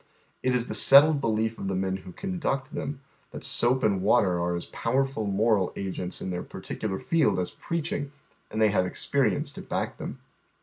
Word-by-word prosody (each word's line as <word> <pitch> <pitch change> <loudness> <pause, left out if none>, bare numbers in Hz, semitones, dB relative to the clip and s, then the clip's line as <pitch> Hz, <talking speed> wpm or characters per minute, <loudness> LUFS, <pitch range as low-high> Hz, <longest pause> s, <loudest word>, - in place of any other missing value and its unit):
It 130 -1 +1
is 125 -1 0
the - - -4
settled 145 +1 +7
belief 110 -1 -1
of 95 - -4
the 95 - -1
men 95 0 -1
who 95 -1 -11
conduct 170 - -3
them 140 -1 -4 0.3
th - - -8
it - - +1
soap 125 +2 +3
and 100 -3 +2
watei 105 +5 +4
are 85 0 -1
as 85 - -4
pow 115 - -4
erf 135 0 +1
ul 110 -2 -2
moral 100 -1 +2
agents 95 -2 -4
m 95 - -3
their 90 0 -3
pai - - -9
titular 95 -3 -4
field 165 - +2
an 90 - 0 0.2
pleaching, 145 -4 -3 0.4
ind 110 - -3
they 110 -1 +5
have 95 -3 +1
experience 115 +1 0
to - - -9
back - - -4
them. - - -6
110 Hz, 210 wpm, -27 LUFS, 95-135 Hz, 0.4 s, settled